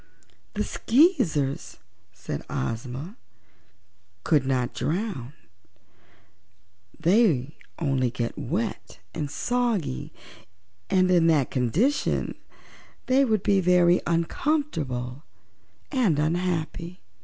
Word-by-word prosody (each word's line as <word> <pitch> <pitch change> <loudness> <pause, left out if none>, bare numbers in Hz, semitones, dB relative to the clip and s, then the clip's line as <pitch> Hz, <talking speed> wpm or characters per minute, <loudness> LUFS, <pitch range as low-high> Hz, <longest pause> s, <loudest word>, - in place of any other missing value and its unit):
"The - - 0
Skeezers," 210 - +2 0.3
said - - -6
Ozma, 125 - -4 1.1
"could 145 -4 +2
not 125 -2 0
drown; 160 - -3 1.7
they 165 - +3 0.2
only 135 -6 +1
get 120 -2 -3
wet 195 - -3 0.2
and 150 -3 -3
soggy 225 - -1 0.8
and 185 -1 +3
in 170 -2 +5
that 150 -5 +3
condition 160 - +1 0.7
they 265 +2 +4
would 215 -6 +1
be 200 -1 +3
very 180 0 +4
uncomfortable 165 - -1 0.7
and 235 - +2
unhappy. 170 +2 -1
165 Hz, 85 wpm, -26 LUFS, 135-210 Hz, 1.7 s, in